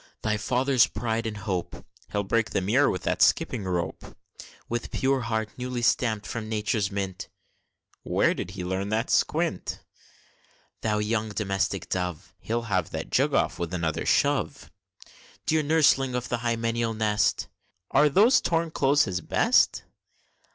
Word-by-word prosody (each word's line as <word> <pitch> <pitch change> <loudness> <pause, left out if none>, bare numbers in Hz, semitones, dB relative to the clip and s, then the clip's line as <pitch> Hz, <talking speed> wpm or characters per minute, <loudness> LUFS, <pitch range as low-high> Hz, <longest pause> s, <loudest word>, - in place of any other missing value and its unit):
Thy 105 -1 +1
father's 125 +4 +2
pride 115 -1 -2
and 105 -1 -5
hope! 95 -3 -4 0.3
(He'll 100 - 0
break 115 +3 0
the - - -1
mirror 120 +10 +3
with 90 - -3
that - - -1
skipping 100 - +2
rope!) 90 -2 -4 0.5
With 120 0 -3
pure 135 0 0
heart 110 -2 -2
newly 125 -1 -3
stamp'd 110 -3 +1
from 110 -2 -5
Nature's 105 -2 0
mint 95 -2 -4 0.7
(Where - - +2
did - - -5
he 90 - -4
learn 95 +2 -2
that 110 +2 -1
squint?) - - 0 1.0
Thou 105 -1 0
young 110 +1 -1
domestic 100 -3 -2
dove! 90 -3 -4
(He'll 115 +1 -2
have 95 -7 -1
that - - -6
jug - - +2
off, - - +1
with 85 +1 -3
another 80 -3 -2
shove!) - - +1 0.7
Dear 155 0 +2
nurseling 145 -4 +3
of 125 0 -3
the 120 - 0
hymeneal 115 -1 -1
nest! 105 -1 +1 0.4
(Are 150 +2 +5
those 210 - +5
torn 165 -1 0
clothes 145 0 +3
his 90 -2 -2
best?) - - +2
110 Hz, 150 wpm, -26 LUFS, 100-125 Hz, 1.0 s, Are